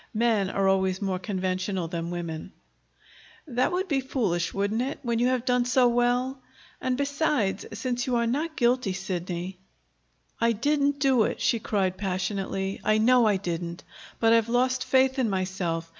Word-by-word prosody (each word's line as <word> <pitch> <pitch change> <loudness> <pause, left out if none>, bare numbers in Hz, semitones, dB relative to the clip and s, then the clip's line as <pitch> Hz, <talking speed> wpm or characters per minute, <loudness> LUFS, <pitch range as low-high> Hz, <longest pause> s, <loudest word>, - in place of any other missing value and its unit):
Men 220 -4 +2
are 195 0 +1
always 190 -1 +2
more 190 -2 -2
conventional 185 -1 -2
than 170 0 -4
women. 170 0 -5 0.9
"That 255 -2 0
would 370 +2 -1
be 280 -5 +1
foolish, 195 -11 -1
wouldn't 200 +3 -1
it, 270 +4 -2
when 235 -2 0
you 245 - +3
have 255 -1 0
done 250 -1 +2
so 245 0 +4
well? 245 +2 +1 0.4
And, 255 -1 0
besides, 280 -8 0
since 245 -1 -2
you 250 - +1
are 235 0 +2
not 305 +7 -1
guilty, 240 -4 +2
Sidney 180 -1 -4 0.4
" - - -36
"I 230 0 +3
didn't 285 +4 +1
do 270 -4 +3
it!" - - -3
she 230 - +1
cried 190 -4 -1
passionately. 195 0 -2
"I 215 0 +3
know 240 +1 +5
I 205 -2 +3
didn't. 170 -2 -4 0.4
But 225 0 +4
I've 230 0 +3
lost 255 +2 +1
faith 265 0 +3
in 245 -4 +2
myself. 185 -3 -2
225 Hz, 170 wpm, -26 LUFS, 190-255 Hz, 0.9 s, know